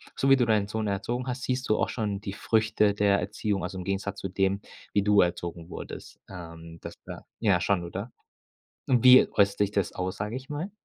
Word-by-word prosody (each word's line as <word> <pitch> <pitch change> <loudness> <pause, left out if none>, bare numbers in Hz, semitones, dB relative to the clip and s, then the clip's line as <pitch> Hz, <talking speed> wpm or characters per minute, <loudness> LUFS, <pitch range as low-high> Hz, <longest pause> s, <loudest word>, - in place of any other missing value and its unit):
so 135 - +1
wie 135 - +8
du 125 -2 +2
deinen 105 -3 +2
Sohn 110 0 -3
erzogen 120 +6 -2
hast, 125 0 -4
siehst 130 0 -2
du 110 - +3
auch - - 0
schon 105 -4 -3
die 100 -2 -5
Früchte 110 -1 +2
der 100 -1 +2
Erziehung, 100 0 -2
also 95 +1 -5
im 90 - -5
Gegensatz 100 +1 -3
zu 95 - -4
dem, 95 +1 0 0.3
wie 100 - +2
du 105 -1 +5
erzogen 85 -1 -3
wurdest? - - -9
Ähm, 85 -2 -10
das - - -8
wär - - -9
ja 95 -6 +2
schon, 90 -2 +1
oder? 100 +7 -6 0.8
Und 125 -2 +2
wie 130 0 +8
äußert 100 0 +2
sich 105 -1 +2
das 100 -3 -1
aus, 90 0 -4
sag 105 +2 -4
ich 130 +1 -6
mal? 155 +7 -4
100 Hz, 215 wpm, -27 LUFS, 95-110 Hz, 0.8 s, wie